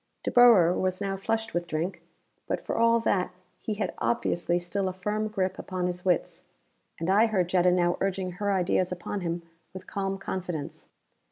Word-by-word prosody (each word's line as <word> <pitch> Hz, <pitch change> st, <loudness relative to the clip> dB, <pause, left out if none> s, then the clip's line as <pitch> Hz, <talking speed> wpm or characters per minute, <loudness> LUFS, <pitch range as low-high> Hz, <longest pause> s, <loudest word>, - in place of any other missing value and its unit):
De -, -, -1 dB
Boer 225 Hz, -9 st, +7 dB
was 185 Hz, 0 st, -1 dB
now 195 Hz, -1 st, -2 dB
flushed 225 Hz, +3 st, -2 dB
with 175 Hz, 0 st, -1 dB
drink, 170 Hz, +3 st, -3 dB, 0.5 s
but -, -, -1 dB
for -, -, -4 dB
all 230 Hz, 0 st, +4 dB
that 190 Hz, -5 st, +1 dB, 0.3 s
he 215 Hz, -, -3 dB
had 205 Hz, -, -2 dB
obviously 175 Hz, -6 st, 0 dB
still 190 Hz, +3 st, -2 dB
a -, -, -5 dB
firm 210 Hz, +4 st, -2 dB
grip 190 Hz, -3 st, -2 dB
upon 185 Hz, -1 st, -3 dB
his 180 Hz, 0 st, -3 dB
wits. 180 Hz, -3 st, 0 dB, 0.6 s
And 165 Hz, -, -2 dB
I 205 Hz, +5 st, +5 dB
heard 185 Hz, -5 st, 0 dB
Jetta 180 Hz, -1 st, +4 dB
now 175 Hz, -1 st, +2 dB
urging 190 Hz, -1 st, -1 dB
her 205 Hz, 0 st, 0 dB
ideas 185 Hz, -1 st, +1 dB
upon 180 Hz, +3 st, -4 dB
him 170 Hz, 0 st, -3 dB, 0.3 s
with 185 Hz, -, -8 dB
calm 195 Hz, -1 st, -3 dB
confidence. 180 Hz, -5 st, -5 dB
185 Hz, 180 wpm, -27 LUFS, 180-205 Hz, 0.6 s, Boer